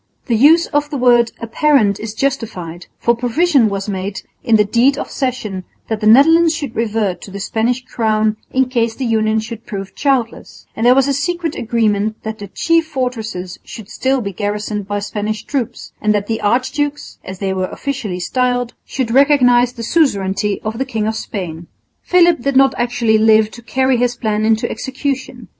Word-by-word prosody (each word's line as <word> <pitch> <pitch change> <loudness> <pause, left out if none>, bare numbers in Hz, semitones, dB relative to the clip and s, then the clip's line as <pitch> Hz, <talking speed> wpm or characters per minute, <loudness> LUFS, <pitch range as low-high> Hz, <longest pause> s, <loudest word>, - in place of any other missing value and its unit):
The 235 - +1
use 310 +8 +5
of 290 0 +1
the 290 - -3
word 240 -2 +4
"apparent" 230 -3 +2
is 220 0 -6
justified, 215 -11 -3
for 235 - +2
provision 250 +1 +2
was 195 0 -4
made 195 +1 -4 0.2
in 230 -4 +3
the 210 -1 +4
deed 245 +7 +2
of - - -5
cession 235 -8 -3 0.3
that 220 -1 -1
the 215 - +1
Netherlands 320 +8 +6
should 285 -7 -5
revert 215 -4 -1
to - - -10
the 200 +1 -7
Spanish 235 +5 -1
crown 220 -3 0
in 265 0 +2
case 235 -3 0
the 265 - -3
union 220 -1 +1
should 220 +1 -8
prove 195 -3 -6
childless; 265 -5 -2
and 225 +2 +1
there 250 - +6
was 270 0 +3
a 280 - +1
secret 330 +3 -2
agreement 215 -2 0
that 220 0 -5
the 205 - -7
chief 330 - +1
fortresses 225 - -4
should 215 -3 -10
still 265 +2 0
be 200 -3 -5
garrisoned 210 0 -3
by 205 0 -2
Spanish 210 +1 -3
troops 265 -6 -4
and 210 0 +2
that 205 -1 -1
the 225 +1 -3
archdukes, 270 +6 -1
as 190 0 -8
they 190 0 -2
were 185 -1 -1
officially 215 -10 -4
styled, 245 +4 -1
should 255 -4 -3
recognise 250 -3 +4
the 235 -2 -7
suzerainty 205 - +1
of 220 +2 -4
the - - +1
King 225 -5 -2
of 220 +1 -1
Spain. 175 -6 -6 0.3
Philip 345 -3 +4
did 275 +1 -1
not 270 0 +5
actually 240 -2 +1
live 220 0 +4
to 235 - -11
carry 260 +2 +1
his 245 0 0
plan 215 -2 -1
into 220 0 +2
execution. 265 +3 -4
230 Hz, 185 wpm, -17 LUFS, 210-265 Hz, 0.3 s, Netherlands